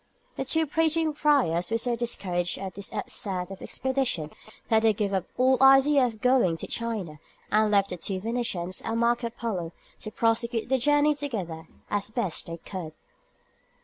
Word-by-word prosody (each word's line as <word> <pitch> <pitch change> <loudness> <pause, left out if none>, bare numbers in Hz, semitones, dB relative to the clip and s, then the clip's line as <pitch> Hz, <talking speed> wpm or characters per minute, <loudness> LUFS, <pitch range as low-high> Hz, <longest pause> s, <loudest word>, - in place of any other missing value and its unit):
The 270 - -3
two 320 +4 +2
preaching 320 +1 +1
friars 275 - +2
were 225 - +1
so 240 +1 -1
discouraged 180 -7 -2
at 190 -1 -6
this 200 -1 -7
outset 185 -2 -3
of 195 - -8
the - - -8
expedition 260 - -1 0.4
that 220 -1 +4
they 220 -1 +4
gave 205 -1 -2
up 190 -2 0
all 260 +1 +3
idea 270 +1 +6
of 225 -4 -2
going 250 -10 +3
to - - -6
China, 210 -10 -4 0.3
and 215 0 +4
left 200 -1 +3
the 180 - -3
two 190 +2 -3
Venetians 200 -5 -3
and 225 +1 -2
Marco 235 0 +1
Polo 195 -8 -4 0.3
to 215 - -6
prosecute 230 +1 0
the 265 0 +2
journey 290 +3 +4
together 200 - -5 0.2
as 205 0 -1
best 215 -7 -2
they 165 0 -5
could. 170 -2 -7
225 Hz, 175 wpm, -27 LUFS, 185-260 Hz, 0.4 s, idea